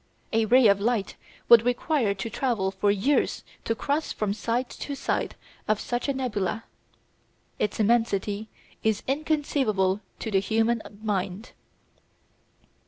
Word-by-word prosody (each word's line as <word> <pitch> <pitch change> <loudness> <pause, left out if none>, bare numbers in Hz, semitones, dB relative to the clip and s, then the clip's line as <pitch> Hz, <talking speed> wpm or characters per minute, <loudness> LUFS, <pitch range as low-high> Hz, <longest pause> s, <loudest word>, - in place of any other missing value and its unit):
A 225 0 +3
ray 250 +3 +5
of 200 -1 +4
light 225 -2 0 0.3
would 235 -2 +9
require 245 -3 +1
to 195 +3 -4
travel 225 -6 0
for 205 +1 0
years 205 +9 +1 0.2
to 225 - 0
cross 290 +6 -1
from 210 -2 -1
side 235 +4 -1
to 285 - -5
side - - -2 0.3
of 215 -1 +2
such 240 +2 -2
a - - +2
nebula. 225 -4 -2 1.0
Its 210 - -1
immensity 215 -2 +1 0.4
is 220 -2 +1
inconceivable 265 -9 +1 0.2
to 220 - -5
the 195 - +4
human 225 +3 +1 0.2
mind. 200 0 -2
225 Hz, 130 wpm, -26 LUFS, 200-245 Hz, 1.0 s, would